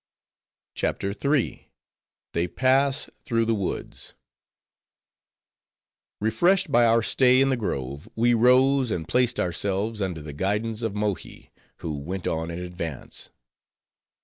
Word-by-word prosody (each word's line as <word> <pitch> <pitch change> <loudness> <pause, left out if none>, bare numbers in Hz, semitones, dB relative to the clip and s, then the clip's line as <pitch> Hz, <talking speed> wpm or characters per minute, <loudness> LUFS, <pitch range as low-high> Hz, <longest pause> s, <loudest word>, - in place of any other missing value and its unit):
CHAPTER 100 0 -2
III. 140 +4 -1 0.6
They 85 +1 0
Pass 135 +5 +2 0.2
Through 115 -2 +1
The 115 - +1
Woods 100 -4 -5 2.0
Refreshed 175 - +2
by 120 -2 +5
our 115 0 +4
stay 130 +2 +4
in 135 0 +4
the 135 - +2
grove, 70 - -4
we 120 +2 +3
rose, 130 +2 +4
and 85 -6 -3
placed 125 -1 +1
ourselves 100 +4 -1
under 90 -5 -3
the 75 -1 -7
guidance 105 +7 -1
of 110 -3 -2
Mohi; 105 -2 -4 0.3
who 75 -3 -4
went 90 +6 -5
on 80 +1 -2
in 85 - -5
advance. 90 -5 -6
110 Hz, 120 wpm, -25 LUFS, 90-125 Hz, 2.0 s, by